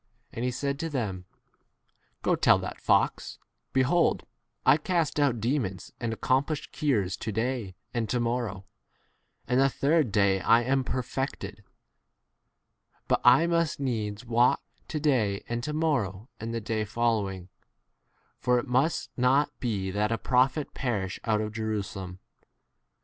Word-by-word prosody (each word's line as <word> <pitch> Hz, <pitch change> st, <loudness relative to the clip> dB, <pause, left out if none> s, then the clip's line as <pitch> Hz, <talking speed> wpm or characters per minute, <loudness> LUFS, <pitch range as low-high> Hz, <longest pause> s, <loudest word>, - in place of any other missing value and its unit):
And 115 Hz, -, -4 dB
he 125 Hz, -, +1 dB
said 140 Hz, +3 st, -2 dB
to 165 Hz, -, -2 dB
them, 105 Hz, -, -3 dB, 1.0 s
Go, -, -, +3 dB
tell -, -, +5 dB
that -, -, -6 dB
fox, -, -, +1 dB, 0.3 s
Behold, 135 Hz, +7 st, +2 dB, 0.4 s
I 135 Hz, +3 st, +7 dB
cast 165 Hz, -2 st, 0 dB
out 135 Hz, -5 st, +2 dB
demons 110 Hz, -6 st, -2 dB
and 115 Hz, -1 st, -2 dB
accomplish 140 Hz, +5 st, 0 dB
cures 105 Hz, -11 st, 0 dB
to 110 Hz, -, -4 dB
day 110 Hz, -3 st, -2 dB, 0.2 s
and 115 Hz, -3 st, -1 dB
to 125 Hz, -, +1 dB
morrow, 115 Hz, -5 st, -2 dB, 0.8 s
and 125 Hz, +2 st, +2 dB
the 135 Hz, 0 st, +5 dB
33 -, -, -16 dB, 0.3 s
third 115 Hz, -, -7 dB
[day] 100 Hz, -1 st, +3 dB
I 115 Hz, +6 st, +4 dB
am 135 Hz, +2 st, +1 dB
perfected: 130 Hz, +2 st, -4 dB, 1.4 s
but -, -, +2 dB
I 125 Hz, +7 st, +7 dB
must 170 Hz, -5 st, +1 dB
needs 110 Hz, -4 st, -2 dB
walk 120 Hz, +3 st, +3 dB, 0.2 s
to 155 Hz, -, -3 dB
day 115 Hz, -10 st, +1 dB
and 120 Hz, 0 st, -3 dB
to 150 Hz, -, -2 dB
morrow 125 Hz, -9 st, -1 dB
and 115 Hz, +1 st, -4 dB
the 115 Hz, 0 st, -3 dB
[day] 110 Hz, 0 st, -1 dB
following, 105 Hz, -5 st, -1 dB, 0.9 s
for 125 Hz, 0 st, +2 dB
it 120 Hz, -, -1 dB
must 130 Hz, +7 st, +1 dB
not 135 Hz, +4 st, +3 dB
be 100 Hz, -6 st, -2 dB
that 105 Hz, +3 st, 0 dB
a 115 Hz, -, +1 dB
prophet 130 Hz, +5 st, +2 dB
34 -, -, -46 dB
perish 105 Hz, -8 st, -2 dB
out 110 Hz, -2 st, +2 dB
of 105 Hz, 0 st, -4 dB
Jerusalem. 100 Hz, -4 st, -4 dB
120 Hz, 150 wpm, -28 LUFS, 105-135 Hz, 1.4 s, I